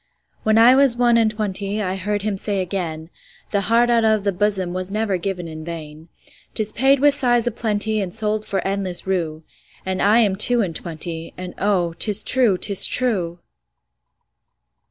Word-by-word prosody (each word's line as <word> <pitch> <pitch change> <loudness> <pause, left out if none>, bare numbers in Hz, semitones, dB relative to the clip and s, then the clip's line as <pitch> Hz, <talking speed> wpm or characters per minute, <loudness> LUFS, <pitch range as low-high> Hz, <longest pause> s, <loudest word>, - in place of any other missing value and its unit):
When 215 0 +1
I 235 +3 +7
was 265 -3 +4
one 240 -1 +3
and 225 -1 +3
twentyI 200 -2 -3
heard 205 +1 -3
him 210 -1 -2
say 200 +1 -2
again,'The 180 +2 -5
heart 230 +4 +2
out 230 -1 +2
of 220 -2 +1
the 200 - 0
bosomWas 185 -2 -2
never 210 -2 -1
given 180 -1 -5
in 155 -1 -9
vain;'Tis 165 +6 -7
paid 270 +4 +2
with 290 +1 +4
sighs 240 -4 +1
a 240 - 0
plentyAnd 215 -3 -1
sold 215 +1 -1
for 195 -2 -3
endless 195 -2 -2
rue.'And 180 +1 -5
I 210 +3 +4
am 200 -4 +1
two 240 +3 +5
and 170 -4 -5
twenty, 165 0 -5
And 180 -1 -8
oh, 185 -4 0
'tis 210 -1 +4
true, 240 -7 +2
'tis 200 +1 +6
true. 180 -9 -2
200 Hz, 155 wpm, -20 LUFS, 180-220 Hz, -, I